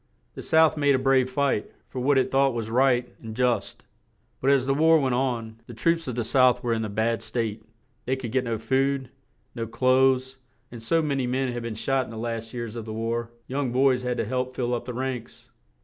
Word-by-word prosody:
The -, -, -8 dB
South 160 Hz, -1 st, +4 dB
made 145 Hz, -2 st, +3 dB
a -, -, +3 dB
brave 130 Hz, -1 st, +2 dB
fight, 135 Hz, -4 st, 0 dB, 0.2 s
for 130 Hz, -, -6 dB
what 135 Hz, +2 st, +2 dB
it 130 Hz, -, +1 dB
thought 135 Hz, -1 st, +3 dB
was 110 Hz, -1 st, -4 dB
right 125 Hz, 0 st, +3 dB
and 110 Hz, -1 st, -8 dB
just; 125 Hz, -1 st, -1 dB, 0.6 s
but 135 Hz, -, +2 dB
as 135 Hz, -2 st, +4 dB
the 135 Hz, -, +2 dB
war 160 Hz, +3 st, +5 dB
went 130 Hz, -3 st, 0 dB
on, 115 Hz, -3 st, -2 dB
the 120 Hz, -, -9 dB
troops 165 Hz, +6 st, 0 dB
of 125 Hz, -, -3 dB
the 120 Hz, -, -1 dB
South 125 Hz, +1 st, +3 dB
were 120 Hz, -1 st, +1 dB
in 110 Hz, -1 st, -1 dB
a 110 Hz, -, -3 dB
bad 115 Hz, +3 st, 0 dB
state; 110 Hz, -1 st, -3 dB, 0.4 s
they 130 Hz, -, +1 dB
could 130 Hz, -4 st, -6 dB
get 130 Hz, 0 st, 0 dB
no 115 Hz, -1 st, -1 dB
food, 135 Hz, +3 st, 0 dB, 0.4 s
no 115 Hz, -1 st, -4 dB
clothes, 130 Hz, +2 st, +2 dB, 0.3 s
and 120 Hz, -2 st, -9 dB
so 160 Hz, +8 st, +1 dB
ma 150 Hz, -2 st, 0 dB
ny 135 Hz, -2 st, -1 dB
men 130 Hz, 0 st, -1 dB
had 120 Hz, -, -4 dB
been 115 Hz, -1 st, -5 dB
shot 135 Hz, +5 st, 0 dB
that 130 Hz, -, 0 dB
in -, -, -12 dB
the 115 Hz, -, -8 dB
last 115 Hz, 0 st, -4 dB
years 120 Hz, -2 st, -5 dB
of 115 Hz, -2 st, -6 dB
the 110 Hz, -, -6 dB
war 115 Hz, +1 st, -2 dB, 0.2 s
young 135 Hz, -1 st, -2 dB
boys 130 Hz, 0 st, +3 dB
had 125 Hz, -1 st, -2 dB
to -, -, -1 dB
help 130 Hz, +2 st, -2 dB
fill 125 Hz, -1 st, -1 dB
up 120 Hz, 0 st, -3 dB
the 125 Hz, -, -5 dB
ranks. 130 Hz, -2 st, -5 dB
125 Hz, 235 wpm, -25 LUFS, 115-135 Hz, 0.6 s, war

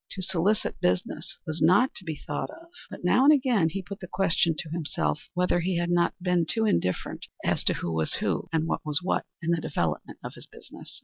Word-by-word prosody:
To 190 Hz, -, -5 dB
solicit 190 Hz, +4 st, 0 dB
business 90 Hz, 0 st, -1 dB
was 155 Hz, 0 st, -4 dB
not 185 Hz, +11 st, +5 dB
to -, -, -9 dB
be 160 Hz, -3 st, -4 dB
thought -, -, -3 dB
of, 330 Hz, +2 st, -13 dB, 0.2 s
but -, -, -9 dB
now 180 Hz, +8 st, +4 dB
and 290 Hz, -, +8 dB
again 250 Hz, -, +3 dB
he 190 Hz, +3 st, -4 dB
put 200 Hz, +2 st, -8 dB
the 180 Hz, -, -8 dB
question 170 Hz, -3 st, +2 dB
to 155 Hz, -, -5 dB
himself 160 Hz, -2 st, -2 dB
whether 180 Hz, 0 st, +2 dB
he 175 Hz, +1 st, 0 dB
had 175 Hz, 0 st, 0 dB
not 175 Hz, 0 st, +2 dB
been 180 Hz, -2 st, +1 dB
too 225 Hz, +4 st, +1 dB
indifferent 90 Hz, -, -1 dB, 0.2 s
as -, -, +1 dB
to -, -, +3 dB
who 85 Hz, -, -3 dB
was 80 Hz, -1 st, 0 dB
who, -, -, -1 dB
and 160 Hz, -1 st, +1 dB
what -, -, -2 dB
was 150 Hz, 0 st, -1 dB
what, 185 Hz, -, 0 dB, 0.2 s
in 165 Hz, -, +1 dB
the 170 Hz, -1 st, +1 dB
development 80 Hz, -, -2 dB
of -, -, -6 dB
his -, -, -10 dB
business. -, -, -12 dB
175 Hz, 225 wpm, -27 LUFS, 160-195 Hz, 0.2 s, and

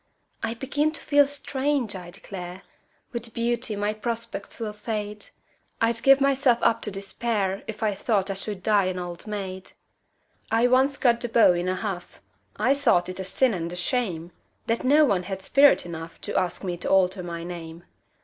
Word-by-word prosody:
I 225 Hz, +1 st, -2 dB
begin 290 Hz, +5 st, 0 dB
to -, -, -5 dB
feel 285 Hz, -1 st, +4 dB
strange, 280 Hz, -4 st, -1 dB
I 180 Hz, -2 st, -8 dB
declare! 180 Hz, 0 st, -8 dB, 0.5 s
With 235 Hz, -2 st, -3 dB
beauty 235 Hz, -1 st, 0 dB
my 205 Hz, +1 st, -1 dB
prospects 225 Hz, -2 st, -4 dB
will 215 Hz, -2 st, -3 dB
fade 210 Hz, -1 st, -4 dB, 0.5 s
I'd 230 Hz, 0 st, +2 dB
give 275 Hz, 0 st, +6 dB
myself 275 Hz, -3 st, +3 dB
up 230 Hz, -, +3 dB
to -, -, -3 dB
despair 200 Hz, 0 st, -2 dB
If 220 Hz, 0 st, -5 dB
I 210 Hz, -1 st, +2 dB
thought 195 Hz, -1 st, 0 dB
I -, -, -1 dB
should 195 Hz, 0 st, -4 dB
die 205 Hz, -3 st, +3 dB
an 185 Hz, 0 st, -2 dB
old 175 Hz, +2 st, -6 dB
maid! 190 Hz, -3 st, -5 dB, 0.8 s
I 225 Hz, +2 st, +3 dB
once 260 Hz, +2 st, +3 dB
cut 235 Hz, -2 st, +3 dB
the 240 Hz, -, -2 dB
beaux 225 Hz, -5 st, +6 dB
in 175 Hz, +1 st, -1 dB
a 185 Hz, -, 0 dB
huff 185 Hz, -2 st, -5 dB, 0.4 s
I 245 Hz, +6 st, +3 dB
thought 235 Hz, -11 st, +2 dB
it 185 Hz, -, -6 dB
a -, -, -2 dB
sin 250 Hz, +5 st, +2 dB
and 170 Hz, -2 st, -3 dB
a -, -, -5 dB
shame 180 Hz, -4 st, -1 dB, 0.3 s
That 230 Hz, +1 st, -1 dB
no 295 Hz, +4 st, +6 dB
one 200 Hz, -9 st, +2 dB
had 190 Hz, +1 st, -6 dB
spirit 280 Hz, +2 st, +5 dB
enough 165 Hz, -1 st, -8 dB
To -, -, -4 dB
ask 180 Hz, +1 st, 0 dB
me 180 Hz, -2 st, -3 dB
to -, -, -4 dB
alter 190 Hz, 0 st, +3 dB
my 170 Hz, -1 st, -5 dB
name. 170 Hz, -1 st, -8 dB
210 Hz, 190 wpm, -25 LUFS, 185-240 Hz, 0.8 s, give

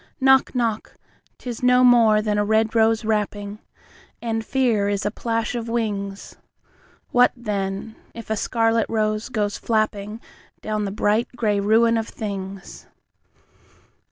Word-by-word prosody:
Knock, 265 Hz, -1 st, +4 dB
knock, 230 Hz, -3 st, -2 dB, 0.4 s
'tis 240 Hz, -3 st, -7 dB
no 250 Hz, 0 st, +4 dB
more 230 Hz, -4 st, +5 dB
than 210 Hz, -1 st, 0 dB
a -, -, +2 dB
red 220 Hz, +1 st, +1 dB
rose 225 Hz, 0 st, +2 dB
rapping, 210 Hz, -1 st, -2 dB, 0.6 s
And 225 Hz, -1 st, -2 dB
fear 225 Hz, -6 st, +1 dB
is 205 Hz, 0 st, -2 dB
a 205 Hz, -, 0 dB
plash 230 Hz, 0 st, -2 dB
of 235 Hz, -1 st, -4 dB
wings. 205 Hz, -4 st, -3 dB, 0.7 s
What, 245 Hz, 0 st, +5 dB
then, 205 Hz, -2 st, -4 dB, 0.2 s
if 230 Hz, -2 st, -8 dB
a -, -, +2 dB
scarlet 225 Hz, +1 st, +1 dB
rose 215 Hz, 0 st, -1 dB
goes 210 Hz, -4 st, -2 dB
flappingDown 215 Hz, 0 st, -3 dB
the 195 Hz, -, -3 dB
bright 210 Hz, +3 st, +1 dB
grey 210 Hz, -4 st, 0 dB
ruin 225 Hz, +3 st, +3 dB
of 220 Hz, -, -4 dB
things! 195 Hz, -2 st, -7 dB
220 Hz, 130 wpm, -22 LUFS, 205-230 Hz, 0.7 s, more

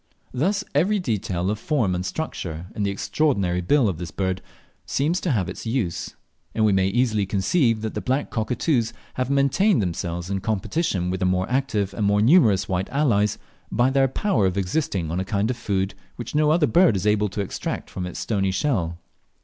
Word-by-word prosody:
Thus 195 Hz, +10 st, 0 dB
every 185 Hz, +9 st, +3 dB
detail 100 Hz, -, -1 dB
of 105 Hz, -, -3 dB
form 115 Hz, -8 st, 0 dB
and 90 Hz, 0 st, -2 dB
structure 90 Hz, -, -4 dB
in -, -, -4 dB
the 100 Hz, -, +1 dB
extraordinary 100 Hz, -, 0 dB
bill 130 Hz, +7 st, +3 dB
of 90 Hz, -5 st, -2 dB
this 85 Hz, -2 st, -5 dB
bird 95 Hz, +3 st, -2 dB, 0.4 s
seems 155 Hz, +6 st, 0 dB
to 180 Hz, -, -1 dB
have 105 Hz, -, +1 dB
its -, -, -7 dB
use, 110 Hz, -8 st, -2 dB, 0.4 s
and 110 Hz, -, +3 dB
we 105 Hz, -, +4 dB
may 95 Hz, 0 st, +3 dB
easily 110 Hz, -2 st, +1 dB
conceive 110 Hz, -, +1 dB
that 110 Hz, -1 st, -3 dB
the -, -, -3 dB
black 130 Hz, +3 st, -1 dB
cockatoos 115 Hz, +2 st, 0 dB, 0.2 s
have 130 Hz, 0 st, -2 dB
maintained 140 Hz, -, +3 dB
themselves 85 Hz, -1 st, -3 dB
in 100 Hz, -, 0 dB
competition 100 Hz, -, -1 dB
with 95 Hz, -, -2 dB
their 95 Hz, -, +1 dB
more 90 Hz, 0 st, 0 dB
active 110 Hz, -7 st, 0 dB
and 100 Hz, 0 st, 0 dB
more 100 Hz, 0 st, +3 dB
numerous 110 Hz, -, +4 dB
white 95 Hz, 0 st, -1 dB
allies, 115 Hz, -8 st, +2 dB, 0.3 s
by 125 Hz, +2 st, +2 dB
their 135 Hz, 0 st, +3 dB
power 130 Hz, -, +1 dB
of 95 Hz, +1 st, -2 dB
existing 95 Hz, -, -1 dB
on 85 Hz, -, -1 dB
a -, -, 0 dB
kind 100 Hz, +4 st, 0 dB
of -, -, -3 dB
food 95 Hz, -4 st, -1 dB, 0.2 s
which 120 Hz, -, -7 dB
no 150 Hz, 0 st, +3 dB
other 155 Hz, 0 st, +4 dB
bird 170 Hz, -, +4 dB
is 95 Hz, +1 st, -2 dB
able 105 Hz, 0 st, +2 dB
to 100 Hz, +2 st, -3 dB
extract 100 Hz, -, -4 dB
from 90 Hz, -1 st, -5 dB
its 90 Hz, -, -6 dB
stony 100 Hz, -3 st, 0 dB
shell. 95 Hz, -, 0 dB
105 Hz, 200 wpm, -23 LUFS, 95-135 Hz, 0.4 s, we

